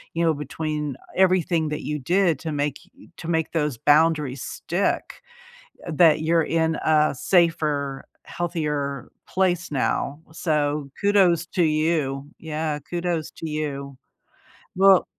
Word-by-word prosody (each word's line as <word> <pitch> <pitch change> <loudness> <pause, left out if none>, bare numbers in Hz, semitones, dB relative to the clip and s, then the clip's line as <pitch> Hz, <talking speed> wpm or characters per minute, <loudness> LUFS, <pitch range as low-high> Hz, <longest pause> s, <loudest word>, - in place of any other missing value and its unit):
you 170 - 0
know, 165 - +3
between 150 0 -4 0.2
everything 180 -4 +2
that 150 - -4
you 150 - -2
did 175 +2 +2
to 160 -2 -4
make 145 -1 -1 0.4
to 170 - -7
make 160 -1 0
those 150 -6 0
boundaries 150 -2 +3
stick 175 +4 -2 0.7
that 155 -1 +4
you're 165 +1 +3
in 160 0 +1
a 155 -1 +3
safer, 150 -5 +1 0.2
healthier 150 -6 -3 0.2
place 180 -3 0
now, 140 +1 -1
so, 150 -4 -1
kudos 190 -5 +3
to 180 -1 0
you, 155 -3 0
yeah, 155 -1 -3
kudos 175 -2 -2
to 165 - -7
you. 140 -3 -4 0.8
Well 195 -1 +6
155 Hz, 120 wpm, -24 LUFS, 150-170 Hz, 0.8 s, Well